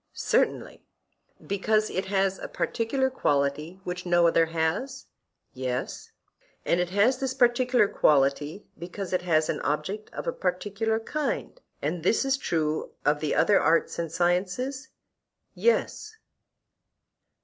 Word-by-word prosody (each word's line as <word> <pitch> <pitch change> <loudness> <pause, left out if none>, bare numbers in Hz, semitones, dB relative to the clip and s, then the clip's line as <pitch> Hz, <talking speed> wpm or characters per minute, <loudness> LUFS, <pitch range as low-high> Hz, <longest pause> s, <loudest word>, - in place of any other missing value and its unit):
Certainly. - - 0 0.6
Because 215 +2 +1
it 190 - -2
has 195 -1 0
a - - -6
particular 265 +3 -1
quality 145 - -1
which 180 0 -5
no 175 -1 +3
other 165 0 +3
has? 165 +12 -2 0.5
Yes. 130 0 -4 0.6
And 175 - +2
it 180 0 0
has 210 +7 +2
this 265 -1 -2
particular 245 -3 +3
quality 145 +3 +1
because 180 +2 -6
it 180 - +1
has 160 -3 +2
an - - -2
object 195 +8 -3
of - - -6
a - - -1
particular 205 - -1
kind; 305 - -3 0.2
and 160 +4 -2
this 225 - +2
is 270 0 +2
true 155 - -2
of 145 0 +3
the 150 -1 -1
other 205 - +4
arts 165 +1 +1
and 165 -2 -3
sciences? 185 +11 -1 0.6
Yes. 440 -2 0
185 Hz, 130 wpm, -26 LUFS, 160-235 Hz, 0.6 s, other